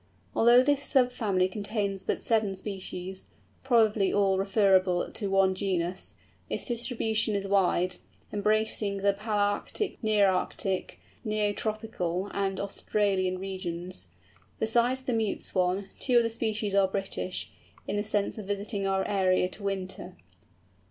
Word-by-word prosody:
Although 240 +2 +6
this 285 0 +2
sub 255 -4 +3
family 200 -7 +1
contains 200 0 -2
but - - -2
seven 215 -4 +1
species, 190 -1 -6 0.4
probably 220 -6 +3
all 195 -2 +2
referable 190 -2 +3
to 205 -3 -3
one 195 -1 +3
genus, 185 -2 -2 0.3
its - - -2
distribution 225 -3 0
is 200 0 -1
wide, 185 -2 +2 0.4
embracing 210 -1 +1
the 200 0 +2
Palæarctic, 205 - -1
Nearctic, 195 -2 +1 0.3
Neo 215 -2 +1
tropical, 205 -4 -2
and 195 -1 -1
Australian 195 -2 0
regions. 180 - -3 0.5
Besides 240 +4 +1
the 255 - -1
Mute 220 -2 0
Swan, 185 +1 0
two 250 -2 +3
other 230 -1 +4
species 220 -3 -2
are 195 -1 +4
British, 190 -1 -3 0.4
in - - -1
the 205 - 0
sense 210 0 -1
of 200 - -8
visiting 200 0 -2
our 195 0 0
area 185 -2 +2
to 195 - -9
winter. 190 -2 -4
200 Hz, 130 wpm, -28 LUFS, 190-220 Hz, 0.5 s, Although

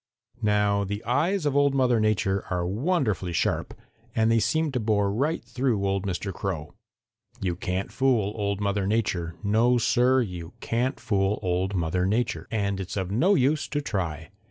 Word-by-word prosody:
"Now 105 -1 +2
the 100 +2 -4
eyes 165 +9 +1
of 145 -2 +1
Old 140 -1 +3
Mother 125 -3 +3
Nature 100 -2 +1
are 90 -1 -1
wonderfully 105 - 0
sharp - - -1 0.4
and 110 0 +3
they 115 - +4
seemed 145 +7 0
to 125 - 0
bore 105 -3 +1
right 145 +9 -1
through 125 -6 0
old 100 0 -1
Mr. 95 +1 -3
Crow. 80 -6 -4 0.7
You 90 -3 -1
can't 90 +2 -3
fool 120 -7 +1
Old 100 -2 -1
Mother 100 -1 0
Nature. 90 -6 -1
No, 115 +4 +3
Sir, 125 +2 +3
you 90 -6 -5
can't 125 +4 -1
fool 100 -2 +1
Old 95 +2 0
Mother 90 +1 0
Nature, 115 +5 -1
and 100 -3 -1
it's 95 +1 -5
of 95 -1 -2
no 170 - +3
use 140 +3 +2
to 145 - -2
try. 85 - -3
105 Hz, 170 wpm, -26 LUFS, 95-125 Hz, 0.7 s, they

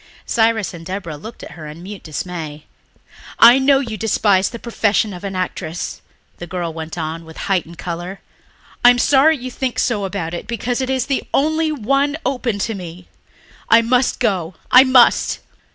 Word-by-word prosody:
Cyrus 225 -4 +1
and 165 -1 -9
Deborah 185 -3 -5
looked 220 +11 -10
at - - -9
her 155 -3 -9
in 155 +3 -10
mute 200 +1 -8
dismay. 155 -2 -6 0.7
"I 240 +3 +8
know 270 +1 +4
you 230 -5 -4
despise 200 -2 +2
the 235 - -7
profession 220 -3 0
of 180 - -9
an 195 -1 -4
actress," 180 -2 -4 0.4
the 175 - -8
girl 170 -2 -4
went 160 +1 -7
on 165 0 -4
with 160 0 -13
heightened 175 -3 -1
colour. 175 +3 -6 0.6
"I 245 - +9
am 245 - +4
sorry 285 +5 +4
you 255 0 -7
think 255 0 -3
so 215 -5 0
about 180 -4 -4
it 175 - -6
because 235 +2 -2
it 260 - -2
is 260 -2 0
the 275 -2 -1
only 315 +2 +1
one 280 +3 0
open 250 -5 -1
to 225 - -3
me. 180 -2 -9 0.6
I 230 0 +6
must 245 +2 +1
go... 180 -4 -1 0.2
I 255 - +9
must." 260 -2 +4
205 Hz, 180 wpm, -19 LUFS, 175-250 Hz, 0.7 s, I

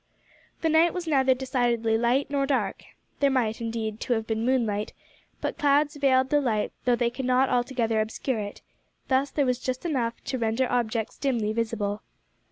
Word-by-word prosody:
The 325 - +2
night 325 +3 +4
was 360 -1 -3
neither 265 -4 +3
decidedly 240 -3 0
light 240 +5 +1
nor 275 -1 +1
dark. 275 -2 -1 0.4
There 280 - +4
might, 235 -4 0
indeed, 225 -1 -3
to 245 - 0
have 220 -1 -1
been 220 0 -2
moonlight, 230 -5 0 0.5
but - - -3
clouds 290 +1 +3
veiled 260 -2 +3
the 295 -1 +4
light 220 -6 0
though 245 -1 +4
they 235 0 0
could 260 +1 -5
not 255 +1 +3
altogether 240 -3 +1
obscure 225 +2 -2
it; 205 -1 -6 0.5
thus 265 +1 +2
there 285 - 0
was 250 -1 0
just 255 +4 -4
enough 245 -8 0
to 260 0 -3
render 230 +3 +1
objects 230 -2 -1
dimly 230 -6 0
visible. 220 -2 -2
245 Hz, 175 wpm, -26 LUFS, 225-270 Hz, 0.5 s, night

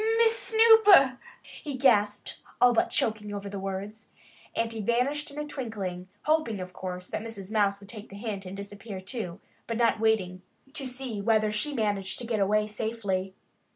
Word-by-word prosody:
"Miss 460 0 +5
Snooper!" 440 - +6 0.2
he 290 -3 -7
gasped, 210 -6 +2 0.2
all 245 0 +6
but 230 - +2
choking 210 -2 -1
over 200 0 -5
the 200 0 -5
words. 195 +3 -5 0.5
And 230 0 -1
he 220 - -4
vanished 255 +8 0
in 285 - -10
a 300 - -2
twinkling, 205 -10 -5 0.2
hoping, 305 -9 +1
of 180 0 -7
course, 180 -1 -6
that - - -3
Mrs. 210 -3 -8
Mouse 200 -2 +2
would 200 0 -15
take 215 -1 -9
the 195 - -11
hint 200 -3 -5
and 190 +2 -7
disappear 200 0 -7
too, 185 -2 -5 0.3
but 230 - -2
not 235 -2 +3
waiting 195 -5 +1 0.3
to 275 -3 -2
see 250 -4 -4
whether 215 0 +2
she 215 +8 -1
managed 205 -7 -1
to 245 - -4
get 225 -2 -1
away 210 +2 +2
safely. 205 -3 -3
215 Hz, 180 wpm, -28 LUFS, 200-245 Hz, 0.5 s, Snooper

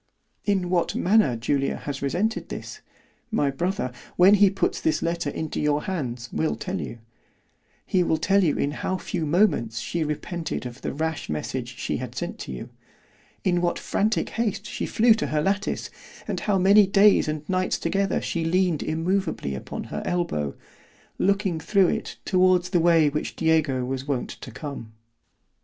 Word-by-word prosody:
"In 190 -4 +1
what 175 -2 +1
manner 180 - +3
Julia 135 +4 0
has 140 -1 -5
resented 190 - -1
this——my 215 - -5
brother, 175 -1 -2 0.2
when 185 +3 +7
he 205 -1 +6
puts 195 0 -1
this 160 - +1
letter 170 -2 -1
into 155 +2 -3
your 150 0 +1
hands, 125 -10 -3
will 160 - 0
tell 190 +1 -4
you; 115 - -6 0.9
He 185 - +2
will 160 -2 +2
tell 195 +5 +3
you 155 -5 +2
in 140 - 0
how 185 +5 -2
few 170 -3 -3
moments 145 - +2
she 140 +9 -2
repented 160 +1 -4
of 125 +1 -8
the - - -3
rash 160 +2 -3
message 75 0 -4
she - - -2
had - - -6
sent - - -5
you——in 175 - -5
what 175 -1 0
frantic 215 +2 0
haste 225 -3 -2
she - - -4
flew 230 +1 +5
to 220 - -2
her 155 - 0
lattice, 200 +3 -1 0.4
and - - -2
how 205 -2 +1
many 195 +2 +6
days 200 -1 +5
and 155 0 -3
nights 185 0 0
together 195 +3 0
she 170 - -2
leaned 175 -1 +1
immoveably 165 - -1
upon 65 - -5
her - - -2
elbow, 75 - -1 0.6
looking 195 -4 +1
through 190 +3 +3
it - - -3
towards 185 -1 +3
the 175 - +3
way 165 -2 +5
which 150 +1 -3
Diego 155 -6 +2
was 135 +1 -4
wont 135 -4 -1
to - - -9
come. 135 -7 -7
170 Hz, 165 wpm, -25 LUFS, 145-190 Hz, 0.9 s, when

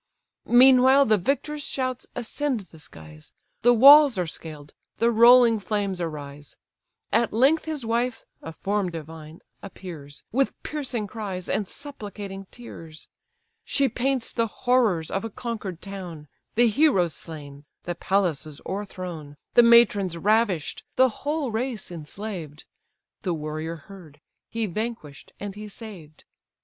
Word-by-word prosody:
Meanwhile 260 +2 +7
the 215 -3 +3
victor's 285 - -2
shouts 255 -3 -3
ascend 250 +1 -2
the 170 -4 -16
skies; 75 - -14 0.3
The 245 - +5
walls 275 +1 +8
are 180 - 0
scaled; 155 -2 -9 0.2
the 235 +1 +3
rolling 235 0 +7
flames 200 -2 -2
arise; 145 -3 -7 0.6
At 230 +1 +2
length 270 +8 +3
his 305 -6 -4
wife 235 +1 -1 0.2
(a 160 - -7
form 200 +3 -1
divine) 160 -1 -9 0.2
appears, 165 -8 -10
With 270 +3 0
piercing 260 -7 -3
cries, 195 -4 -6
and 205 - -1
supplicating 205 -8 -8
tears; 165 -10 -11 0.5
She 280 -1 +1
paints 260 0 -2
the 230 -1 +1
horrors 225 -9 +1
of 195 - -2
a 225 - -4
conquer'd 215 -6 -6
town, 180 -6 -8 0.3
The 240 +2 +5
heroes 215 - +3
slain, 145 -3 -10 0.2
the 175 - -3
palaces 170 -6 -1
o'erthrown, 180 -7 -6 0.2
The - - +8
matrons 215 -7 +5
ravish'd, 205 -4 +1
the 260 0 +5
whole 290 +2 -3
race 225 -4 -3
enslaved: 165 -2 -7 0.6
The 180 -6 -1
warrior 155 +2 -4
heard, 160 -2 -14 0.3
he 230 -1 -2
vanquish'd, 210 -7 -6
and 200 -1 -5
he 210 +1 -8
saved. 195 -8 -11
205 Hz, 130 wpm, -25 LUFS, 165-240 Hz, 0.6 s, walls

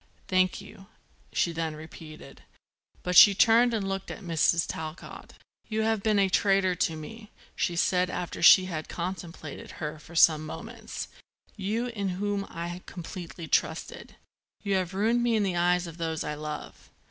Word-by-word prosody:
"Thank 185 -1 +2
you," 195 -1 -14 0.4
she 170 - +1
then 165 -1 -3
repeated. 155 -2 -12 0.6
But 180 0 -2
she 205 -2 +9
turned 230 +4 +5
and 210 -4 -1
looked 195 0 -4
at - - -8
Mrs. 165 -1 +2
Talcott. 160 0 -7 0.3
"You 220 -1 -1
have 220 -1 +1
been 215 0 +2
a 195 -1 +4
traitor 195 -1 +2
to 165 -2 0
me," 210 +8 -10 0.3
she 175 - -1
said 180 +1 +2
after 180 -1 -5
she 185 +2 +8
had 160 -4 -5
contemplated 170 -4 -6
her 150 +1 -5
for 170 +3 -14
some 155 -2 +5
moments, 155 - -7 0.5
"you, 215 +4 -2
in 205 -4 -3
whom 205 0 -2
I 175 +2 -6
completely 175 -2 -8
trusted. - - -2 0.5
You 200 -1 -1
have 185 0 -3
ruined 225 +4 +2
me 240 -1 +2
in 215 - +2
the 190 -3 -1
eyes 175 +1 +2
of 165 -1 -9
those 160 -1 -2
I - - -3
love." 150 0 -7
180 Hz, 165 wpm, -28 LUFS, 165-200 Hz, 0.6 s, she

